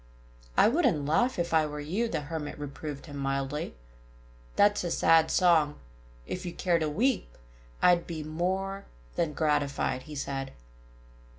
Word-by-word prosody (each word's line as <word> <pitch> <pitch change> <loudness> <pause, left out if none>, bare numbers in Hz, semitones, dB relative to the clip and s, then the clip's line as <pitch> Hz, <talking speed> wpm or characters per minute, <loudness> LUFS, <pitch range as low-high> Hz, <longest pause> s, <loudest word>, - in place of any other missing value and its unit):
"I - - +7
wouldn't 235 - +2
laugh, 240 - +2
if 170 -1 -1
I 155 -1 +4
were 150 0 -6
you," 185 +11 -1
the 190 - -2
Hermit 150 0 -5
reproved 145 0 -6
him 145 -3 -8
mildly. 135 - -2 0.8
"That's 205 -1 +4
a 175 - -1
sad 165 -1 +4
song.... 165 -5 +4 0.5
If 180 - -5
you 175 -2 -5
care 170 -1 +1
to 155 -1 0
weep, 210 - 0 0.5
I'd 175 -1 +5
be 160 -3 -4
more 190 +5 -2 0.3
than 165 -3 0
gratified," 145 -4 0
he 150 - -7
said. 135 -1 -4
160 Hz, 150 wpm, -29 LUFS, 145-180 Hz, 0.8 s, I